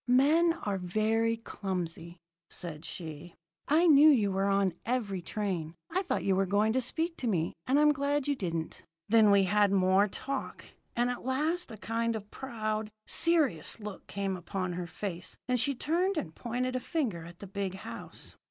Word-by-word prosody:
"'Men 300 +7 +5
are 200 -2 -1
very 220 +5 +1
clumsy,' 175 -5 -5 0.3
said 165 -2 -4
she. 165 0 -7 0.3
'I 320 +4 +4
knew 305 -1 +8
you 215 -9 +4
were 195 +1 +1
on 195 -2 +2
every 220 -6 -1
train. 175 -4 -3 0.2
I 370 +3 +1
thought 370 - -2
you 195 - +2
were 195 0 +1
going 210 +3 +2
to 260 - +2
speak 325 +7 -1
to 250 - -2
me, 170 -7 0
and 270 +3 +4
I'm 300 0 +6
glad 285 0 0
you 285 - +2
didn't.' 170 -7 -4 0.3
"Then 220 -1 +6
we 200 -1 +6
had 205 +1 +3
more 190 +1 +4
talk; 275 +6 -5 0.3
and 240 +1 +2
at 245 - -6
last 300 +5 0
a 220 - -8
kind 230 +2 -1
of 210 -1 -7
proud, 215 -4 -3 0.2
serious 300 - +2
look 210 -3 -8
came 195 -2 -3
on 185 -3 -1
her 175 0 -4
face, 175 +1 -5
and 250 -1 +2
she 280 +3 +2
turned 345 +8 0
and 160 - -3
pointed 250 +4 -2
a - - +1
finger 240 - -2
at 170 +1 -11
the 200 - -9
big 195 -1 -3
house. 190 - -9
215 Hz, 180 wpm, -30 LUFS, 185-260 Hz, 0.3 s, knew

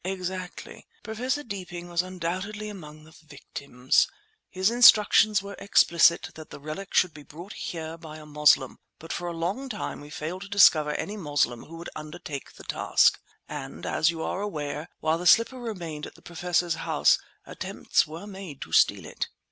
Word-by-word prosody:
"Exactly. 185 -1 -5 0.2
Professor 255 +6 -2
Deeping 180 -6 -7
was 175 0 +1
undoubtedly 185 +4 -4
among 155 -6 -10
the 155 - -17
victims. 140 -3 0 0.4
His 190 +4 +1
instructions 215 -3 +6
were 200 0 -7
explicit 170 -4 +4
that 155 -1 -11
the - - -10
relic 155 +7 -7
should 180 -3 +4
be 150 - -11
brought 170 +7 -11
here 165 -1 -6
by 155 -2 -9
a 155 - -11
Moslem, 150 -3 +3 0.2
but 165 - -7
for 175 - -4
a - - -2
long 195 +12 -2
time 210 -9 -5
we 145 - -11
failed 160 +5 -5
to 200 - -7
discover 155 -7 +5
any 210 +2 -4
Moslem 145 - 0
who 165 - -11
would 170 - -8
undertake 155 -2 -7
the - - -13
task; - - +3 0.3
and, - - -7
as 160 - +2
you 165 -1 -3
are 195 - -2
aware, 150 -6 -4
while 160 +1 +1
the 180 - -1
slipper 230 +6 +5
remained 175 -10 -5
at - - -14
the - - -18
Professor's 175 0 0
house - - +3 0.3
attempts - - -1
were 165 +5 -8
made 190 -8 -9
to - - -14
steal - - +4
it." - - -4
175 Hz, 175 wpm, -27 LUFS, 155-195 Hz, 0.4 s, instructions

